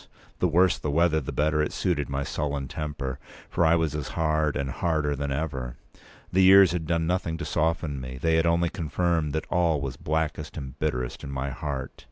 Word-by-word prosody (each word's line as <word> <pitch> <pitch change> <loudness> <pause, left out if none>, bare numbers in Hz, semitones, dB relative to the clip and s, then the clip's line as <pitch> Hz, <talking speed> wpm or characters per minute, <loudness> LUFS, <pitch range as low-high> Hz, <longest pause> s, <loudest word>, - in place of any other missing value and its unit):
The 90 - +3
worse 90 +1 +3
the 75 - -3
weather, 80 +1 +3
the 65 - -5
better 75 +1 +1
it 75 - -1
suited 80 -7 -1
with - - -9
my 70 +1 -1
sullen 70 -2 -2
temper. 70 -3 -4 0.3
For - - +2
I 80 0 +5
was 80 -3 0
as 75 -2 -3
hard, 75 -2 +1
and 70 -2 -2
harder 75 -2 0
than 70 0 -3
ever. 70 -4 -3 0.5
The 95 - +3
years 95 -1 +8
had 85 -3 -3
done 85 -1 +1
nothing 90 -1 -1
to 85 - -5
soften 80 -4 0
me. 65 0 -6
They 80 +4 +2
had 80 +1 +3
only 85 0 +2
confirmed 80 -3 0
all 85 -2 +3
that 70 - -5
was 70 - -4
blackest 80 0 -2
and 70 -1 -7
bitterest 65 -5 -2
in 70 - -6
my 70 0 -3
heart. 70 -1 -4
75 Hz, 210 wpm, -26 LUFS, 70-85 Hz, 0.5 s, years